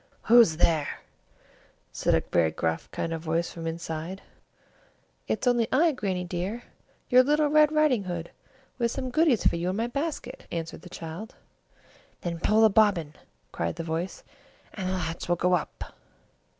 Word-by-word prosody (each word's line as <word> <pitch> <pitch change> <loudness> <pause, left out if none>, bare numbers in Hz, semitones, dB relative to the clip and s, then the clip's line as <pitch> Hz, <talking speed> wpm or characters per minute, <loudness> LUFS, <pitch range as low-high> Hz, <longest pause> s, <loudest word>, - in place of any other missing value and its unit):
"Who's 225 -9 +6
there?" 160 -4 +1 0.9
said - - +1
a - - +2
very 80 -2 +3
gruff 80 +1 -2
kind 165 - -3
of 165 - -4
voice 165 +1 -1
from 165 -1 -6
inside. 165 +2 -5 1.0
"It's - - -1
only 240 -2 +3
I, 320 +5 +4
Grannie 195 -9 -2
dear, 180 +7 -4 0.5
your 250 0 +8
little 295 +3 +2
Red 305 0 +5
Riding 300 -9 +2
Hood 175 -2 -5 0.5
with 235 -1 +2
some 260 +1 -4
goodies 310 -6 +3
for - - +3
you 175 +2 -1
in 185 - -2
my 225 +3 0
basket, 275 0 -4
answered 165 -1 -5
the 180 - -12
child. 170 +5 -8 0.9
"Then 170 -1 -4
pull 215 +5 +3
the 220 - +7
bobbin," 195 -8 +3 0.4
cried - - -2
the 165 - -5
voice, 165 +3 -4 0.5
"and 190 -3 -3
the - - -1
latch 175 -2 -4
will 175 - +3
go 180 +1 +1
up." 175 - -3
185 Hz, 165 wpm, -27 LUFS, 165-245 Hz, 1.0 s, your